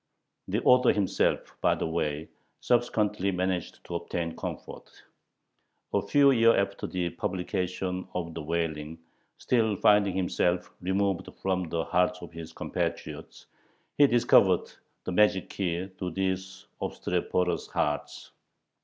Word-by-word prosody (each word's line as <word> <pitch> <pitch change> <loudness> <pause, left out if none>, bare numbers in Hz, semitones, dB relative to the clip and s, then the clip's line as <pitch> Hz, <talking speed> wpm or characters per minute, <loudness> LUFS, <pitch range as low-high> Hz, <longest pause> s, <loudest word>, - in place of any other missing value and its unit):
The - - -1
author 125 0 +6
himself, 100 -3 0
by - - +3
the - - -3
way, 80 -2 -2 0.3
subsequently 110 -5 +1
managed 90 -1 -2
to - - -8
obtain 85 -1 -3
comfort. - - -7 1.0
A 100 - +3
few 140 +7 +5
years 115 -2 +5
after 100 0 -1
the 90 -2 -2
publication 90 0 -3
of 85 -2 -3
the 80 - -5
"Wailing," 80 -1 -3 0.4
still 110 -4 +1
finding 100 -1 +4
himself 90 -1 0
"removed 95 0 0
from 95 -3 0
the 85 0 -1
hearts 90 0 +1
of 85 - -9
his 80 0 -8
compatriots," - - -4 0.5
he 145 - +6
discovered 120 -2 +4 0.3
the - - -4
magic 95 -1 +3
key 90 0 -2
to 90 - -2
these 95 +1 -3 0.2
obstreperous 90 -1 -1
hearts. 75 -1 -2
90 Hz, 125 wpm, -28 LUFS, 85-100 Hz, 1.0 s, author